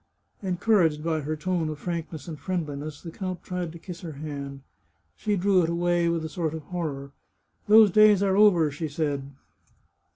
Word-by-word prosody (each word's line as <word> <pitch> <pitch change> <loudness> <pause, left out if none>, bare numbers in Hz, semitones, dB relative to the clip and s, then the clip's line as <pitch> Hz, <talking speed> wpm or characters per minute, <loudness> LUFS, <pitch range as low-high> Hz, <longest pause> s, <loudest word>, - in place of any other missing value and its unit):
Encouraged 180 -5 +2
by 160 -1 0
her 155 +1 -3
tone 165 0 -1
of 155 - -5
frankness 165 -2 -5
and 155 -3 -7
friendliness, 150 -3 -4
the 165 - -7
count 185 0 -5
tried 180 -2 -4
to 170 - -10
kiss 170 +1 -9
her 165 -4 -6
hand. 140 -2 -6 0.5
She 210 -1 -1
drew 190 0 +3
it 165 - 0
away 175 0 +1
with 165 -1 -1
a - - -2
sort 160 -1 -3
of 160 - -7
horror. 145 -5 -5 0.3
" - - -44
Those 215 -1 +7
days 210 0 +6
are 190 -1 +2
over," 185 -7 +5
she 155 +3 -4
said. 145 -2 -2
165 Hz, 185 wpm, -26 LUFS, 150-185 Hz, 0.5 s, Those